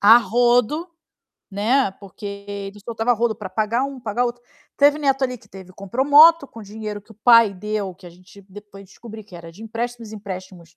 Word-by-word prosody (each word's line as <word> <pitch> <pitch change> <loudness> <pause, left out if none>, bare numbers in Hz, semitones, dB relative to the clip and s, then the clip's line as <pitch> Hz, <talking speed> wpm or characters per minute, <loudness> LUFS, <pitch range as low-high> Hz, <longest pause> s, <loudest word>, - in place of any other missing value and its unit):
a 220 +3 +8
rodo, 245 +7 +1 0.6
né, 220 +5 +1
porque 200 +1 -15 0.2
ele 200 0 -7
soltava 230 0 -2
a - - +5
rodo 230 0 0
pra 205 -3 -7
pagar 215 +6 0
um, 275 -2 -7
pagar 235 +1 -1
outro. 240 0 -4 0.3
Teve 290 +1 +4
neto 275 -2 0
ali, 250 -1 -3
que - - -23
teve 190 -1 -13
compro 200 +8 -3
moto 300 +1 +7
com 225 -3 -12
dinheiro 210 0 -7
que 220 +2 -18
o - - -20
pai 230 0 +5
deu, 205 -1 -4
que 185 0 -16
a - - -10
gente 185 +3 -18
depois 200 0 -13
descobri 220 +3 -12
que 190 -4 -14
era 165 -1 -11
de 200 +6 -14
empréstimos, 230 0 -6
empréstimos, 185 -5 -9
215 Hz, 200 wpm, -21 LUFS, 200-245 Hz, 0.6 s, a